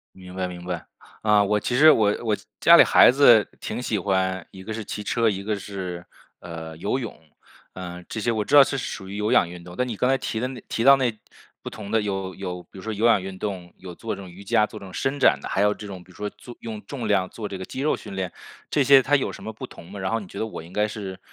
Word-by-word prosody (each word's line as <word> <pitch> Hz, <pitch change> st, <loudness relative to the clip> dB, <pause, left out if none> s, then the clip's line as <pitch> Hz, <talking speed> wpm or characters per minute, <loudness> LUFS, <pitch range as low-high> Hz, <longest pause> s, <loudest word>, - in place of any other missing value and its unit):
明 90 Hz, -1 st, -12 dB
白 95 Hz, -1 st, -1 dB
明 90 Hz, -1 st, -8 dB
白。 90 Hz, -1 st, -4 dB, 0.4 s
呃， 105 Hz, -1 st, +5 dB
我 105 Hz, +1 st, +1 dB
其 120 Hz, -, -2 dB
实 155 Hz, +5 st, +8 dB
我 105 Hz, -5 st, +3 dB
我 110 Hz, -2 st, +1 dB, 0.2 s
家 -, -, +8 dB
里 -, -, +10 dB
孩 -, -, +7 dB
子 120 Hz, -6 st, +7 dB, 0.2 s
挺 120 Hz, +3 st, -4 dB
喜 110 Hz, -3 st, -1 dB
欢 95 Hz, -2 st, 0 dB
一 95 Hz, -, -11 dB
个 110 Hz, -, -7 dB
是 110 Hz, -, -5 dB
骑 105 Hz, -, -5 dB
车， 115 Hz, +3 st, +1 dB
一 100 Hz, -1 st, -3 dB
个 105 Hz, 0 st, -1 dB
是， 90 Hz, -3 st, -6 dB, 0.3 s
呃， 80 Hz, -2 st, -8 dB
游 105 Hz, +10 st, -1 dB
泳， 115 Hz, -, -6 dB, 0.6 s
呃， 90 Hz, -1 st, -7 dB
这 110 Hz, -, -5 dB
些 120 Hz, -, +1 dB
我 110 Hz, -2 st, -1 dB
知 -, -, -5 dB
道 145 Hz, -, +11 dB
这 135 Hz, -, -2 dB
是 -, -, -3 dB
属 95 Hz, -2 st, -7 dB
于 100 Hz, -, -6 dB
有 105 Hz, +1 st, 0 dB
氧 85 Hz, -, +4 dB
运 90 Hz, 0 st, -10 dB
动。 90 Hz, 0 st, -11 dB
但 125 Hz, +4 st, 0 dB
你 115 Hz, -, -4 dB
刚 125 Hz, -, +1 dB
才 135 Hz, -, +4 dB
提 110 Hz, -, -3 dB
的 125 Hz, -, -1 dB
那 130 Hz, -2 st, -8 dB
提 115 Hz, -, -1 dB
到 140 Hz, +2 st, +9 dB
那 120 Hz, -5 st, 0 dB, 0.5 s
不 -, -, -5 dB
同 105 Hz, -2 st, -9 dB
的 110 Hz, +1 st, +2 dB
有 95 Hz, -2 st, -3 dB
有 90 Hz, -2 st, -5 dB
比 85 Hz, -, -17 dB
如 95 Hz, -, -8 dB
说 110 Hz, 0 st, -3 dB
有 110 Hz, +3 st, 0 dB
氧 110 Hz, -4 st, +4 dB
运 95 Hz, -1 st, -7 dB
动， 90 Hz, -4 st, -5 dB
有 90 Hz, -2 st, -10 dB
做 115 Hz, -, -4 dB
这 -, -, -9 dB
种 95 Hz, -, -10 dB
瑜 95 Hz, +3 st, -12 dB
伽， 105 Hz, +2 st, +2 dB
做 110 Hz, -, -10 dB
这 100 Hz, -, -10 dB
种 95 Hz, -, -11 dB
伸 135 Hz, +2 st, -1 dB
展 -, -, +5 dB
的， -, -, -6 dB
还 95 Hz, -, 0 dB
有 105 Hz, 0 st, +4 dB
这 105 Hz, -, -9 dB
种 95 Hz, -3 st, -8 dB
比 90 Hz, -, -19 dB
如 -, -, -19 dB
说 105 Hz, 0 st, -4 dB
做 120 Hz, -, -13 dB
用 110 Hz, -2 st, -6 dB
重 130 Hz, +2 st, -5 dB
量 95 Hz, -3 st, +2 dB
做 110 Hz, -2 st, -6 dB
这 95 Hz, -, -5 dB
个 95 Hz, -, -6 dB
肌 130 Hz, -, -7 dB
肉 150 Hz, -, +2 dB
训 100 Hz, -, -9 dB
练， 95 Hz, -1 st, -3 dB, 0.4 s
这 145 Hz, -, +2 dB
些 135 Hz, 0 st, +7 dB
它 140 Hz, +3 st, +2 dB
有 135 Hz, -, 0 dB
什 -, -, -10 dB
么 110 Hz, -, -5 dB
不 110 Hz, -, -8 dB
同 85 Hz, -, -13 dB
吗？ 100 Hz, -, -7 dB
然 95 Hz, +3 st, -2 dB
后 115 Hz, -, +1 dB
你 100 Hz, -, -10 dB
觉 100 Hz, -, -11 dB
得 110 Hz, -, -1 dB
我 110 Hz, -, -7 dB
应 85 Hz, -, -13 dB
该 105 Hz, +2 st, +1 dB
是， 100 Hz, -3 st, -6 dB
105 Hz, 315 characters per minute, -24 LUFS, 95-115 Hz, 0.6 s, 道